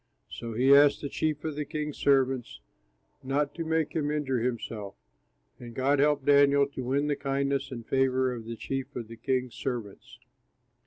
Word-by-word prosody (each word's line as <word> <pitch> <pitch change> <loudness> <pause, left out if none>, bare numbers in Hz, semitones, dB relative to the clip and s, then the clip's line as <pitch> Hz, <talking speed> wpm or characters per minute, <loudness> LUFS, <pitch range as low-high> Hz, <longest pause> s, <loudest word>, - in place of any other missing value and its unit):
So 115 -1 -6
he 130 +4 +5
asked 145 0 +6
the 145 - -4
chief 155 0 -2
of 155 -2 -3
the 150 - -2
king's 150 0 -5
servants 130 - +1 0.6
not 140 +2 -1
to 170 - -4
make 160 -1 0
him 150 -2 0
injure 145 -4 -1
himself. 115 -4 -4 0.6
And 120 -1 -10
God 140 +2 +2
helped 145 -1 +2
Daniel 140 0 +5
to 130 -2 -6
win 135 +4 0
the 145 -1 0
kindness 140 -1 -1
and 120 -4 -7
favor 130 -1 +1
of 115 -2 -7
the 115 0 -5
chief 135 +2 -4
of 120 -3 -5
the 115 - -8
king's 125 +1 -1
servants. 120 -7 -6
135 Hz, 175 wpm, -28 LUFS, 125-145 Hz, 0.6 s, asked